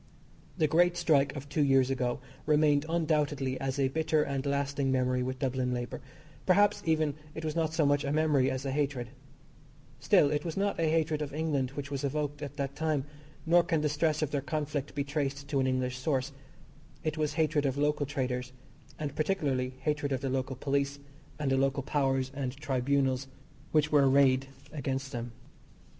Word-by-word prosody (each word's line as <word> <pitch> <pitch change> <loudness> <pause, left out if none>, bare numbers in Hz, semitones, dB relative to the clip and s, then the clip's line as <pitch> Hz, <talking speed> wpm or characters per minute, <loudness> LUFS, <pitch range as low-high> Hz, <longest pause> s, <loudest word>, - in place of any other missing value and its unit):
The 160 - +3
great 175 +3 +3
strike 145 -4 +3
of 140 0 -6
two 150 +2 -1
years 135 -1 +4
ago 125 -1 -1 0.3
remained 150 -1 +3
undoubtedly 150 -5 0
as 135 0 -2
a 135 -1 +2
bitter 155 +1 +1
and 140 -2 -2
lasting 140 -1 0
memory 125 -1 +1
with 130 +1 -2
Dublin 130 -1 -1
labour 120 +3 -5 0.5
perhaps, 205 +2 +4
even, 155 -2 +2 0.2
it 160 - -5
was 155 0 -2
not 160 -1 0
so 160 -3 +3
much 145 0 +2
a 140 - -1
memory 150 -4 +3
as 130 +1 -3
a 135 - -1
hatred. 135 -4 -1 0.9
Still, 145 - +4
it 150 0 0
was 165 0 -4
not 200 +1 0
hatred 160 -1 +1
of 145 -1 -4
England 150 -5 0
which 140 0 -5
was 140 -1 -3
evoked 145 +1 -2
at 145 -1 -6
that 140 0 -3
time, 155 -4 0 0.4
nor 175 +2 +6
can 165 -2 0
the 150 - +1
stress 155 +1 +1
of 150 - -2
their 145 - 0
conflict 145 -1 -3
be 140 - 0
traced 140 -1 -3
to 140 - +1
an 130 - +2
English 130 0 -1
source. 135 0 -1 0.7
It 155 -1 -1
was 155 -1 -1
hatred 155 -2 +1
of 135 0 -2
local 145 0 +1
traders, 130 -3 -3 0.4
and, 145 -2 -4
particularly, 140 -7 0
hatred 145 0 -1
of 130 -1 -1
the 135 - -2
local 130 0 -2
police, 140 +1 -1 0.4
and 145 -3 -1
the 135 - +3
local 135 0 +1
powers 135 -2 0
and 135 -1 -4
tribunals, 135 -1 0 0.4
which 155 -1 +2
were 140 -2 +5
arrayed 135 -1 +4 0.3
against 135 -2 -3
them. 120 -2 -5
140 Hz, 185 wpm, -30 LUFS, 135-155 Hz, 0.9 s, nor